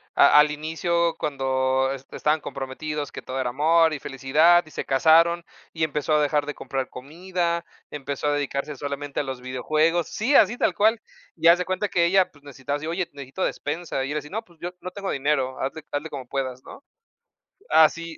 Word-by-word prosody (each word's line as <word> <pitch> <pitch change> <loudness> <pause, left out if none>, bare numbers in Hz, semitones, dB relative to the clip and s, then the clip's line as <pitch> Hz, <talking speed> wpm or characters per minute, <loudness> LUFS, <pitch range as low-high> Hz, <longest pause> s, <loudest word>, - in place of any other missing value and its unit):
a 140 - +6
al 150 0 +5
inicio 165 +3 -1
cuando 130 -2 0
es 135 0 -9
estaban 155 +1 0
comprometidos, 145 +2 -5
que - - -7
todo 130 +1 -5
era 125 -2 -1
amor 160 +4 +3
y 145 - -4
felicidad, 155 +6 +3
y - - -15
se - - -4
casaron, 165 +5 +4 0.3
y 160 - -3
empezó 150 0 -2
a 150 - +3
dejar 145 0 +1
de 150 - -4
comprar 135 -1 -4
comida, 170 +5 -3 0.3
empezó 140 0 -4
a 145 - +2
dedicarse 145 0 -2
solamente 140 0 -4
a - - -4
los 130 -2 -5
videojuegos. 155 +7 0
Sí, 255 +7 0
así 215 +5 +5
tal - - +1
cual, 220 +2 +3 0.4
y 165 - +2
haz 170 +1 +8
de 180 - -2
cuenta 185 +3 -1
que 175 -2 +1
ella, 190 +1 +3
pues, 145 -1 -22
necesitaba, 140 0 -5
así 155 +2 -7
oye, 175 +1 -2
necesito 140 +5 -6
despensa, 150 -2 -3
y 135 - -4
era 150 - -1
así, 150 0 -11
no, 220 +2 -4
pues, 170 -4 -24
yo 175 - -4
no 185 - -6
tengo 195 0 -4
dinero, 135 -2 0
hazle 145 +4 -4
hazle 145 +2 -3
como 135 -4 -7
puedas, 130 -1 -4
¿no? 280 - -12 0.9
Así. 165 +1 +3
150 Hz, 200 wpm, -24 LUFS, 135-170 Hz, 0.9 s, haz